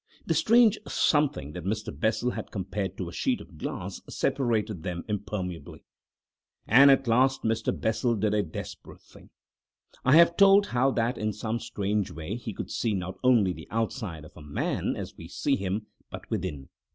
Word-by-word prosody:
The - - +1
strange 230 -1 +4
something 145 - +1
that 90 - -6
Mr. 105 +3 -3
Bessel 120 +3 0
has - - -5
compared 95 -1 -4
to 90 - -4
a 85 - -8
sheet - - 0
of - - -14
glass - - -5
separated 110 - -1
them 90 -2 -4
impermeably. 95 -6 -5 0.8
And 135 +5 +7
at 135 0 +4
last 130 +3 +3
Mr. 110 0 -1
Bessel 115 +2 +1
did 105 0 0
a 105 - +3
desperate 85 -5 -8
thing. - - -18 0.7
I 130 +3 +5
have 170 +1 +6
told 200 +1 +6
how 130 -3 +2
that 120 +2 0
in 110 0 -1
some 110 +2 -3
strange 105 -3 -2
way 80 +4 -5
he 115 -2 -6
could - - -7
see 110 -3 0
not 95 0 -5
only 115 -8 +4
the 80 -1 -11
outside 110 - -3
of - - -16
a 85 - -12
man 75 -1 -2
as - - -6
we - - -9
see - - 0
him, 100 +3 -3 0.2
but - - -9
within. 85 -10 -4
110 Hz, 175 wpm, -27 LUFS, 95-125 Hz, 0.8 s, And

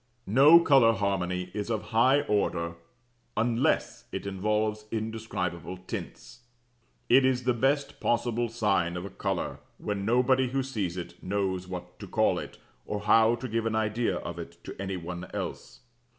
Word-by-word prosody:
NO 140 - +7
COLOUR 135 -8 +5
HARMONY 90 -3 -1
IS 105 +1 -3
OF 110 -2 -1
HIGH 130 +5 +4
ORDER 85 -7 0 0.6
UNLESS 115 +2 +1
IT - - -5
INVOLVES 105 +2 -1
INDESCRIBABLE 110 -6 -3
TINTS. - - -7 0.7
It 130 +2 +6
is 130 -1 +2
the 125 0 +2
best 135 +4 0
possible 120 0 0
sign 100 -7 0
of 90 - -5
a 100 - -7
colour - - -3 0.2
when 100 -1 -3
nobody 125 +3 +3
who 135 +1 0
sees 100 -9 -3
it 90 - -7
knows 95 -1 -2
what 90 -1 -8
to - - -8
call - - +2
it, - - -8 0.3
or 105 -1 -3
how 110 +2 +5
to 125 +2 -6
give 115 0 -1
an 110 - -1
idea 110 +2 0
of - - -6
it - - -10
to - - -8
any 95 -1 -3
one 90 +1 -6
else. - - -6
110 Hz, 160 wpm, -28 LUFS, 95-120 Hz, 0.7 s, NO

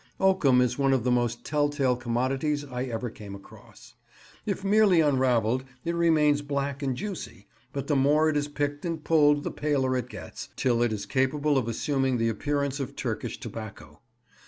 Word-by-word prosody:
Oakum 145 -10 +4
is 125 +1 0
one 135 -1 +3
of 130 -4 +1
the 125 - +1
most 120 -1 0
tell 145 -1 +1
tale 135 -4 +1
commodities 130 +5 -1
I 125 -2 -4
ever 120 -1 -4
came 100 -3 -9
across. 100 - -15 0.5
If 200 -2 -2
merely 200 -3 +4
unravelled, 130 -5 +2 0.2
it 170 - 0
remains 155 -4 +3
black 140 -1 -3
and 135 -3 -1
juicy; 175 - -6 0.3
but 140 -1 -4
the 145 - 0
more 145 +3 +4
it 155 - +1
is 145 0 0
picked 145 0 -3
and 165 -3 -3
pulled 145 -2 +4
the - - -3
paler 135 -3 0
it 125 -1 -3
gets, 110 - -9
till 120 -2 +1
it 120 -1 +2
is 105 -2 -4
capable 145 +3 +1
of 130 -4 +1
assuming 135 +2 0
the 115 0 +1
appearance 140 +4 -1
of 135 - -5
Turkish - - -4
tobacco. 110 -2 -9
135 Hz, 180 wpm, -27 LUFS, 125-150 Hz, 0.5 s, Oakum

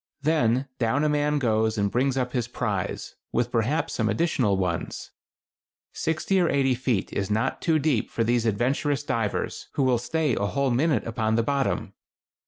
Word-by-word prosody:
Then 140 -4 +2
down 130 +5 +1
a 150 - +2
man 150 0 +1
goes 110 -4 +1
and 100 -1 +1
brings 130 +2 +1
up 125 -1 -1
his 125 -3 -1
prize, 105 -6 -3 0.2
with 120 +1 0
perhaps 125 +8 0
some 110 -2 0
additional 110 - +1
ones. 90 -3 -3 0.8
Sixty 160 +4 0
or 175 - +3
eighty 135 -2 +2
feet 125 -5 -1
is 100 -1 -2
not 110 +2 0
too 160 -2 +2
deep 145 -6 0
for 115 - -1
these 120 0 +1
adventurous 135 +6 0
divers, 115 -7 -2
who 140 - +1
will 125 -2 +3
stay 150 +2 0
a 100 - 0
whole 140 +3 0
minute 135 0 +1
upon 110 -1 0
the 115 - +2
bottom. 140 +2 -1
125 Hz, 175 wpm, -25 LUFS, 110-140 Hz, 0.8 s, or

